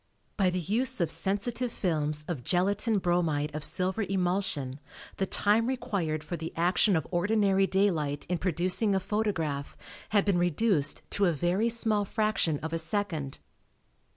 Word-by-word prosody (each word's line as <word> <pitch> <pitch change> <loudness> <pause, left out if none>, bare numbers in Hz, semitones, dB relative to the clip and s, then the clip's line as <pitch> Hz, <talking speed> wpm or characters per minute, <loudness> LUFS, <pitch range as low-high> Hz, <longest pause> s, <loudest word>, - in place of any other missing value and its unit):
By 190 -2 +2
the 180 0 -2
use 240 - +1
of 170 -3 +2
sensitive 235 +5 0
films 150 -6 -1
of 155 -9 -4
gelatine 200 - +1
bromide 165 -5 0
of 155 0 -4
silver 185 +6 +1
emulsion 180 -8 -1 0.4
the 195 - -1
time 215 +4 +2
required 175 - -2
for 165 +3 -5
the 165 -1 -6
action 180 +4 +3
of 160 - 0
ordinary 195 +1 +2
daylight 165 -8 0
in 180 -1 -1
producing 185 +4 +1
a - - +2
photograph 175 -9 -2 0.3
had 205 -2 +2
been 195 -3 +2
reduced 175 -3 +1
to 200 - +2
a - - +3
very 175 +8 0
small 220 -3 +1
fraction 200 -7 0
of 160 +1 -4
a 165 - +1
second. 165 -6 -2
185 Hz, 155 wpm, -28 LUFS, 160-205 Hz, 0.4 s, action